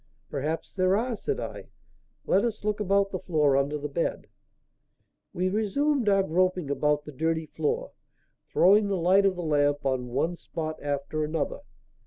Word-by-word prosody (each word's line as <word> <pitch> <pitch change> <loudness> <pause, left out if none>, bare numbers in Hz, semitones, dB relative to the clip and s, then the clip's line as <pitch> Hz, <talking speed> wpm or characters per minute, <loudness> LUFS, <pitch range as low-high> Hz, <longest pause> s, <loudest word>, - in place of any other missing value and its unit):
"Perhaps 150 +3 -3
there 185 0 +2
are," 240 +2 -1
said 430 - -3
I. - - -6 0.6
"Let 195 - +3
us 225 -3 -2
look 210 0 -1
about 200 -1 +2
the 185 - -3
floor 150 -6 +2
under 140 +2 +1
the 150 0 -4
bed." 150 +4 -2 1.1
We 180 +1 -1
resumed 220 +5 +1
our 195 -1 +4
groping 180 -3 +1
about 150 +1 +1
the 150 - -8
dirty 160 +3 -1
floor, 470 - -2 0.6
throwing 205 +3 +5
the 195 -1 0
light 190 +3 +4
of 190 - 0
the 175 - -5
lamp 145 -2 +1
on 130 -2 0
one 145 +8 -1
spot 155 -2 -5
after 145 +1 -2
another. 155 0 -2
175 Hz, 165 wpm, -27 LUFS, 150-200 Hz, 1.1 s, throwing